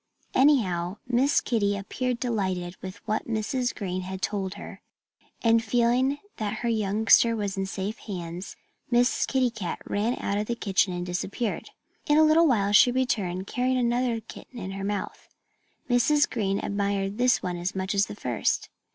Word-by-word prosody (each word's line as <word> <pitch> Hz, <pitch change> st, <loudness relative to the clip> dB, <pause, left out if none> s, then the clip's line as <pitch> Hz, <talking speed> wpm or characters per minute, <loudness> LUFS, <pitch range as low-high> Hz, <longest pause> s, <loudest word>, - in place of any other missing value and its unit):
Anyhow, 200 Hz, -10 st, +3 dB
Miss 255 Hz, +4 st, +3 dB
Kitty 205 Hz, -4 st, 0 dB
appeared 250 Hz, +5 st, -3 dB
delighted 190 Hz, -7 st, -2 dB
with 190 Hz, +3 st, -9 dB
what 215 Hz, 0 st, -1 dB
Mrs. 235 Hz, +3 st, -1 dB
Green 185 Hz, -3 st, -3 dB, 0.2 s
told 195 Hz, 0 st, -3 dB
her. -, -, -10 dB, 0.6 s
And 230 Hz, -1 st, +4 dB
feeling 245 Hz, +5 st, +2 dB, 0.2 s
that 210 Hz, -1 st, -2 dB
her -, -, +2 dB
youngster 220 Hz, +2 st, +4 dB
was 205 Hz, -3 st, -2 dB
in 195 Hz, 0 st, -2 dB
safe 195 Hz, +3 st, -4 dB
hands, 175 Hz, -2 st, -6 dB, 0.3 s
Miss 245 Hz, 0 st, +2 dB
Kitty 255 Hz, -2 st, +1 dB
Cat 205 Hz, -6 st, -4 dB
ran 220 Hz, +5 st, -1 dB
out 200 Hz, +1 st, -1 dB
of 210 Hz, -, -2 dB
the 235 Hz, -, -1 dB
kitchen 195 Hz, -3 st, +1 dB
and 175 Hz, 0 st, -3 dB
disappeared. 195 Hz, +5 st, -3 dB, 0.4 s
In 295 Hz, -, +4 dB
a 315 Hz, -, +7 dB
little 315 Hz, +2 st, +5 dB
while 205 Hz, -7 st, +2 dB
she 230 Hz, +4 st, +7 dB
returned, 205 Hz, -8 st, -1 dB
carrying 255 Hz, +4 st, 0 dB
another 240 Hz, -1 st, +1 dB
kitten 235 Hz, +3 st, -12 dB
in 190 Hz, -4 st, -5 dB
her 195 Hz, 0 st, -5 dB
mouth. 205 Hz, 0 st, -4 dB, 0.6 s
Mrs. 270 Hz, +4 st, +3 dB
Green 195 Hz, -4 st, -1 dB
admired 200 Hz, +1 st, -2 dB
this 250 Hz, 0 st, +3 dB
one 180 Hz, -1 st, -2 dB
as 175 Hz, +2 st, -3 dB
much 190 Hz, +1 st, -2 dB
as 200 Hz, 0 st, +2 dB
the -, -, -7 dB
first. 125 Hz, -, -1 dB
210 Hz, 165 wpm, -26 LUFS, 195-245 Hz, 0.6 s, a